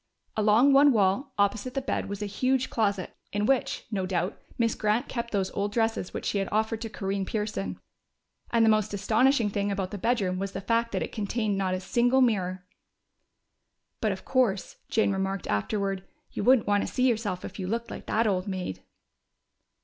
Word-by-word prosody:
Along 220 +6 +5
one 280 +1 +7
wall, 205 +6 +2
opposite 205 +5 0
the - - +2
bed, 260 - -2
was 200 +1 -4
a - - -1
huge 255 +6 0
closet, 200 -4 -1 0.2
in 205 0 0
which, 265 +1 +1
no 190 -3 -1
doubt, 180 0 -1 0.2
Miss 230 -2 +2
Grant 215 +3 0
kept 235 -2 -3
those 195 -3 -1
old 200 +1 -2
dresses 225 -4 0
which - - -5
she 200 - 0
had 195 - -2
offered 220 +1 0
to 225 - -4
Corinne 195 -1 -2
Pearson. 210 0 -3 0.7
And 230 -1 +4
the - - +5
most 215 -1 +1
astonishing 225 +3 +3
thing 200 0 -1
about 195 -2 -2
the 205 - -5
bedroom 200 -5 0
was 195 0 -3
the - - -3
fact 230 +3 +1
that - - 0
it - - -6
contained 215 -1 -1
not 190 -1 0
a - - -3
single 245 +7 +2
mirror! 185 -6 +1 1.3
("But, 215 - +1
of 190 - -6
course," 235 -8 +1
Jane 220 -2 +2
remarked 195 0 -2
afterward, 195 - -1 0.3
"you - - -3
wouldn't 255 0 +5
want 205 0 +3
to - - -3
see 255 0 +2
yourself 215 -6 -1
if - - -8
you 185 - -3
looked 230 +3 -2
like - - -8
that 225 +2 +2
old 190 -3 0
maid!") 185 - -4
210 Hz, 195 wpm, -27 LUFS, 195-230 Hz, 1.3 s, one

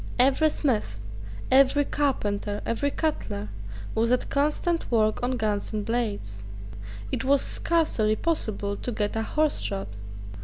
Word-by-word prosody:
Every 270 +5 +4
smith, 220 - -1 0.5
every 275 +2 +5
carpenter, 205 -9 -1
every 285 +5 0
cutler, 190 - -2 0.4
was 230 +2 +1
at 250 - +1
constant 300 +4 0
work 215 -2 +2
on 250 +1 0
guns 210 -2 -1
and 210 -1 -2
blades. 205 - -2 0.7
It - - -1
was 275 +1 +4
scarcely 275 -11 +2
possible 215 -9 -1
to 245 - -4
get 210 -2 -1
a 225 - 0
horse 305 +6 +1
shod. 195 -2 -3
235 Hz, 130 wpm, -26 LUFS, 210-285 Hz, 0.7 s, every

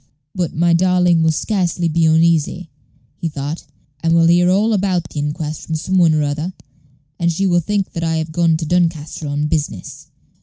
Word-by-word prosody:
"But 180 -4 -3
my 170 +2 +2
darling 180 -1 +3
will 160 - +3
scarcely 175 -1 -1
be 165 0 +2
uneasy," 165 +1 +1 0.5
he 165 - -3
thought; 145 +2 -5 0.4
"she 165 - +1
will 165 0 +4
hear 175 +1 +4
all 210 +4 +2
about 190 -4 0
the 150 - -5
inquest 150 +1 -4
from 160 - -2
some 185 +4 0
one 165 -3 +4
or 150 - +1
other, 150 +5 -3 0.7
and 170 0 +1
she 195 +4 -1
will 175 -2 +3
think 200 +3 -2
that 165 - -4
I 165 0 0
have 160 0 -3
gone 170 +1 +1
into 160 0 +1
Doncaster 165 -2 -1
on 145 +1 -1
business. 150 - -4
165 Hz, 190 wpm, -18 LUFS, 155-180 Hz, 0.7 s, will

